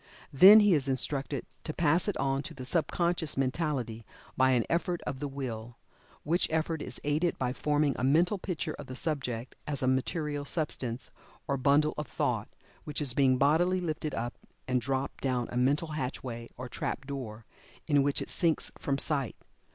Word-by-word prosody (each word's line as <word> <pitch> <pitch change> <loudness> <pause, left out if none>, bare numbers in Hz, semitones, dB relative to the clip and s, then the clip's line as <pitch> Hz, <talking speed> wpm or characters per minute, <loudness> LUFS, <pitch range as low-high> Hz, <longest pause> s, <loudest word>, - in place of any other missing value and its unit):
Then 195 +10 +10
he 205 -2 +5
is 140 -4 +2
instructed 135 0 -1 0.2
to 155 - -5
pass 165 +3 +2
it 205 - -1
on 135 0 0
to - - -8
the 130 -1 -7
sub 160 +5 +1
conscious 170 -4 0
mentality 130 -5 -1 0.3
by 130 0 +4
an 125 -3 +3
effort 175 +1 0
of 135 -3 -4
the 145 - -2
Will, 120 -4 -6 0.5
which 170 +4 +1
effort 160 0 -1
is - - -6
aided 155 +4 +1
by 125 -1 -1
forming 150 0 +1
a - - -2
mental 170 +9 +3
picture 180 -3 -3
of 145 - -8
the 130 - -7
subject 130 -5 -3
as 140 -3 -1
a - - +2
material 145 +3 0
substance, 135 -5 -2 0.4
or 140 - +1
bundle 145 +3 +3
of 150 - -4
thought, - - -1 0.3
which 150 - -3
is 140 -5 +1
being 130 -1 +4
bodily 165 +7 +3
lifted 155 -4 -3
up 120 +1 -4 0.3
and 125 -1 +1
dropped 135 +2 -2
down 125 -3 0
a - - -5
mental 140 +6 +2
hatch 140 -4 -3
way, 115 -2 -6
or 125 +1 -5
trap 135 +2 -4
door, 120 -6 -6 0.4
in 145 -3 +4
which 140 0 +1
it - - -10
sinks 165 -3 +1
from 140 -1 0
sight. 140 -4 -1
140 Hz, 185 wpm, -30 LUFS, 130-155 Hz, 0.5 s, Then